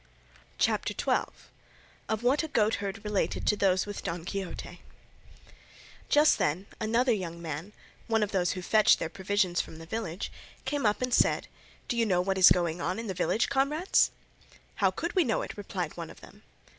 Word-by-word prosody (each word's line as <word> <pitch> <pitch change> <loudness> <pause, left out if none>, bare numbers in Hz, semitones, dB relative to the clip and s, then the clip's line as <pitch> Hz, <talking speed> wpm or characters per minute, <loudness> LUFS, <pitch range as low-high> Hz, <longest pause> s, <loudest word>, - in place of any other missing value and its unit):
CHAPTER - - +1
XII. - - +1 0.8
OF 220 +1 -1
WHAT 260 +4 +3
A 320 - -3
GOATHERD 210 -5 0
RELATED 210 -2 -1
TO 210 - +3
THOSE 190 -2 +2
WITH 205 -1 -6
DON 170 -1 -4
QUIXOTE 195 -1 -5 1.3
Just 300 +1 +5
then 170 +7 0
another 235 +4 +2
young 175 -6 -2
man, 165 +3 -5 0.4
one 225 -2 +2
of 210 - -2
those 180 -3 +1
who 185 -2 -6
fetched 215 +3 +5
their 160 - -3
provisions 190 -2 0
from 160 - -11
the 165 - -10
village, 190 -2 -4 0.3
came 290 -6 0
up 210 +4 0
and 250 -1 -1
said, - - +3 0.4
"Do - - -1
you 230 -1 +2
know 180 -3 +2
what 190 +1 0
is 185 - +9
going 170 -1 +1
on 180 +3 -1
in 230 - -4
the 195 - -3
village, 185 +5 +1
comrades?" 285 +6 +2 0.7
"How - - +4
could - - -4
we 370 -3 +4
know 230 -6 0
it?" - - -7
replied 185 -5 -4
one 170 -2 -6
of - - -14
them. - - -15
200 Hz, 180 wpm, -29 LUFS, 180-230 Hz, 1.3 s, is